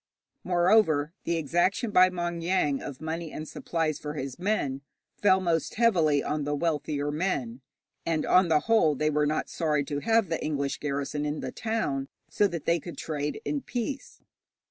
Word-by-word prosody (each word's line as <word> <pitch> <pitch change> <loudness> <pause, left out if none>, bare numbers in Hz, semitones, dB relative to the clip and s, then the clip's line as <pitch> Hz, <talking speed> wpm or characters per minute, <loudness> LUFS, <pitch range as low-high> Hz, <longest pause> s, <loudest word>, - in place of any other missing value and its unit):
Moreover, 175 -4 +3
the 170 0 0
exaction 175 - +1
by 185 -2 +6
Maung 175 -2 -3
Yaing 165 -6 +1
of 140 -1 -7
money 160 0 -4
and 155 - -6
supplies 160 -2 -2
for 150 0 -5
his 135 -1 -5
men 175 -9 -1 0.4
fell 190 -2 +5
most 170 -3 -1
heavily 170 -11 +3
on 150 0 -1
the 145 +1 -1
wealthier 145 -2 -1
men, 140 -7 -2 0.4
and 160 -2 0
on 185 0 +5
the 155 -2 +3
whole 220 -7 +3
they 155 +3 +1
were 150 0 +2
not 155 +1 -1
sorry 150 -3 0
to 145 0 -3
have 225 +4 +2
the 165 -1 -2
English 140 -2 -2
garrison 145 0 -2
in 150 +1 -2
the - - -4
town, 150 - -2 0.2
so 205 - +2
that 170 -5 -6
they 170 0 +2
could 170 +2 -9
trade 150 -2 -3
in 290 - -1
peace. 260 +3 -5
160 Hz, 175 wpm, -28 LUFS, 145-180 Hz, 0.4 s, by